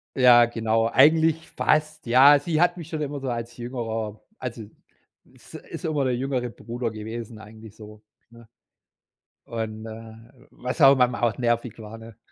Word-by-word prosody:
Ja, 125 -2 +7
genau 115 -1 0
eigentlich 160 +5 +3
fast, 155 0 0
ja. 135 +4 +7
Sie 155 +2 -2
hat 175 +1 +2
mich 165 -2 -9
schon 155 -2 -4
immer 145 -1 -4
so 135 -1 -4
als 120 0 -5
Jüngerer 115 -3 -5 0.2
also 120 -3 -6 0.6
ist - - -17
ist - - -9
immer 150 -4 0
der 125 -1 0
jüngere 125 -1 -2
Bruder 120 0 -5
gewesen 110 +1 -8
eigentlich 110 0 -13
so, 105 -1 -13 0.3
ne? 115 0 -17 1.0
Und, 110 -1 -5
äh, 110 0 -10 0.3
was 125 +6 -5
auch 135 0 +8
manchmal 125 -2 +1
auch 115 -3 +1
nervig 120 -2 -1
war, 110 +1 -9
ne, 115 -1 -13
120 Hz, 160 wpm, -24 LUFS, 110-135 Hz, 1.0 s, auch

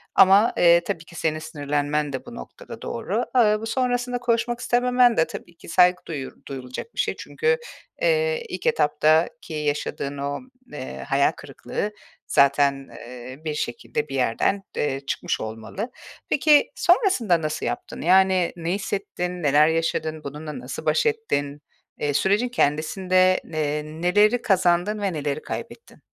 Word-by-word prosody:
Ama, 195 +4 +6
eee, 170 0 +6
tabii 165 -1 -4
ki 170 - -15
senin 155 -1 -1
sinirlenmen 145 -1 -2
de 130 - -5
bu 240 - -10
noktada - - -10
doğru. - - -2
Iıı, 215 -2 +4
bu 225 - -4
sonrasında 245 0 0
konuşmak 240 0 0
istememen 245 0 +3
de 160 - +3
tabii 170 - -9
ki - - -13
saygı 180 +1 +4
duyu 145 -5 -5
duyulacak 130 - -7
bir - - -7
şey. - - 0
Çünkü, 470 +1 0 0.4
eee, 485 -1 +1
ilk - - -6
etaptaki 160 - +2
yaşadığın 145 -2 -2
o, 140 +1 -3 0.3
eee, 65 - -6
hayal - - +3
kırıklığı 210 - -5 0.4
zaten, 140 0 +3
eee, 125 +2 -10
bir 155 - -1
şekilde 455 - -3
bir - - -4
yerden, 195 0 +1
eee, 135 -2 0
çıkmış - - -2
olmalı. 115 - -6 0.4
Peki, 295 0 +4
sonrasında 345 - +3
nasıl 155 0 -3
yaptın? - - -4
Yani, 185 0 +4
ne 170 0 -3
hissettin? 180 -3 -3
Neler 145 +1 +5
yaşadın? 160 -1 -1
Bununla 150 - -7
nasıl - - -7
baş - - +2
ettin? 150 - -1 0.4
Eee, 145 -1 0
sürecin 205 - +2
kendisinde 185 +1 +2
ne 160 - -9
eee, 150 0 -1
neleri 180 +9 +2
kazandın 190 +1 +2
ve 195 -3 -1
neleri 145 -1 -2
kaybettin? 465 - -8
175 Hz, 145 wpm, -24 LUFS, 150-230 Hz, 0.4 s, Ama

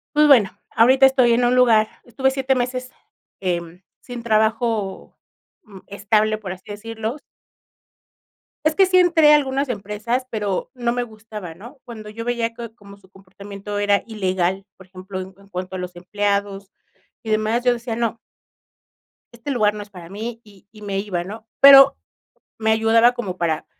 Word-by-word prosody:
pues, 300 0 +5
bueno 235 -9 +6 0.3
ahorita 260 +4 +6
estoy 255 -3 +4
en 245 - +2
un 245 +1 +2
lugar, 225 -4 +4 0.2
estuve 265 +3 0
7 265 0 0
meses, 255 0 -3 0.5
em, 175 -1 -3 0.2
sin 245 -2 -8
trabajo, 220 -2 -1 0.5
uh, 200 -7 -14
estable 215 +2 0
por 200 -4 -7
así 185 - -15
decirlo. 225 +2 -5 1.5
Es 310 - +3
que 385 +1 +5
sí 370 0 +3
entré 330 -4 +5
a 300 - +8
algunas 275 -1 0
empresas, 215 +3 -3
pero 210 0 -3
no 240 -2 -2
me 245 0 -1
gustaba, 215 -6 -10
¿no? 235 - -13
Cuando 220 -3 -10
yo 230 +2 -7
veía 235 -1 -2
que 230 -1 -8
como 200 -3 -15
su 190 -1 -24
comportamiento 200 +2 -9
era 205 0 +2
ilegal, 190 -3 -2
por 190 -1 -17
ejemplo, 185 +1 -8
en 185 0 -9
cuanto 185 0 -6
a - - -4
los 180 0 -7
empleados 200 +1 -2 0.5
y 225 - -8
demás, 215 +2 0
yo 245 -1 +3
decía: 235 -1 -5
"No" 230 -1 -2 1.1
"este 235 +4 -7
lugar 215 -5 +2
no 210 - -7
es 205 - -19
para 180 -4 -12
mí", 225 +3 -6
y 200 -3 -20
y 215 - -16
me 200 -1 -3
iba, 185 -4 -3
¿no? 220 +4 -10
Pero 275 0 +9 0.6
me 220 0 +1
ayudaba 225 +2 +4
como 200 -7 -5
para 160 -2 -1
220 Hz, 170 wpm, -21 LUFS, 200-240 Hz, 1.5 s, Pero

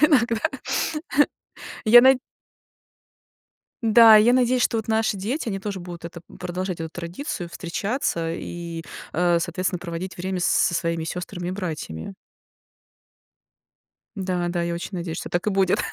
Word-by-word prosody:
Иногда. 245 -7 +4 1.4
Я 235 +3 +9
на 260 +1 +6 1.6
Да, 225 -1 +8
я 215 +3 +6
надеюсь, 250 0 +3
что 225 - +2
вот 220 - -5
наши 220 -1 +1
дети, 230 +7 -3
они 195 - -2
тоже 195 -1 -5
будут 175 -1 -9
это 170 0 -9 0.2
продолжать 180 0 -4
эту 160 - -3
традицию, 175 - -5
встречаться 170 -2 -2
и, 170 -1 -6 0.3
э, 175 0 +3
соответственно, 180 +1 -2
проводить 175 +1 -6
время 185 0 -3
с - - 0
со - - +3
своими 165 -1 -1
сёстрами 180 +1 -5
и - - -1
братьями. 170 - -5 2.0
Да, 185 -3 -1
да, 175 -1 -1
я 170 - -2
очень 170 - -5
надеюсь, 170 -2 -4
что - - -5
так 175 +2 -2
и - - +3
будет. 195 -2 +2
185 Hz, 145 wpm, -24 LUFS, 170-220 Hz, 2.0 s, Я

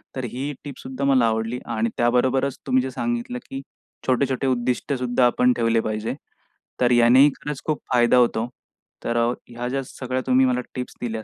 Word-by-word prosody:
तर 130 - -3
ही 135 +4 -3
टिप 145 -3 -8
सुद्धा 130 +1 -6
मला 130 -3 +4
आवडली, 115 +2 -1
आणि 115 0 -1
त्याबरोबरच 130 +3 +2
तुम्ही 130 -1 +3
जे 130 - -4
सांगितलं, 120 0 -3
की 135 0 -5 0.5
छोटे-छोटे 130 +1 +1
उद्दिष्ट 125 +2 0
सुद्धा 125 0 +2
आपण 125 +1 +3
ठेवले 115 -1 +2
पाहिजे. 110 +3 -3 0.6
तर 125 -1 +3
यानेही 120 +4 +6
खरंच 150 -2 -5
खूप 155 -1 -1
फायदा 120 0 +4
होतो. 120 -1 +2 0.6
तर 120 0 -1 0.3
ह्या 120 +1 -5
ज्या 135 +1 -1
सगळ्या 130 0 -4
तुम्ही 130 0 +4
मला 125 0 +1
टिप्स 125 -1 -5
दिल्या, 110 -2 -3
125 Hz, 170 wpm, -23 LUFS, 120-130 Hz, 0.6 s, यानेही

